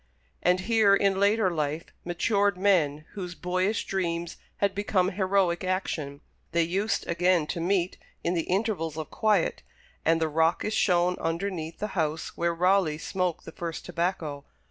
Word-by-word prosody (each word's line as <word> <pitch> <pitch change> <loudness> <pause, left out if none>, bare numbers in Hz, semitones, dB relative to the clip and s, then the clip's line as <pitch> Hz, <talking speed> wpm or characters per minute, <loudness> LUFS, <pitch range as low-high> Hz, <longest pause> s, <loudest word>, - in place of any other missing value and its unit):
And 180 +1 +3
here 215 -1 +4
in 195 -1 +2
later 200 -1 +3
life, 155 -1 -2 0.2
matured 200 +3 +1
men, 160 -7 +2
whose 180 -3 -6
boyish 185 +5 0
dreams 170 -3 -2 0.2
had 200 -1 +1
become 195 -2 +1
heroic 190 -2 +1
action, 160 -6 -2 0.3
they 170 0 +3
used 195 +5 -1
again 175 -1 +2
to 170 - -4
meet 180 +1 0 0.2
in 170 - +1
the 165 -2 -1
intervals 185 -5 -1
of 155 - -5
quiet, 210 -6 +1 0.4
and 165 0 +3
the 160 - +1
rock 160 +2 +1
is 210 - -1
shown 180 -2 +2
underneath 165 -1 -3
the 210 - -3
house 160 -3 -2
where 170 0 0
Raleigh 180 -3 +3
smoked 180 0 -2
the - - -8
first 165 -1 -5
tobacco. 170 -5 -2
180 Hz, 155 wpm, -27 LUFS, 165-195 Hz, 0.4 s, here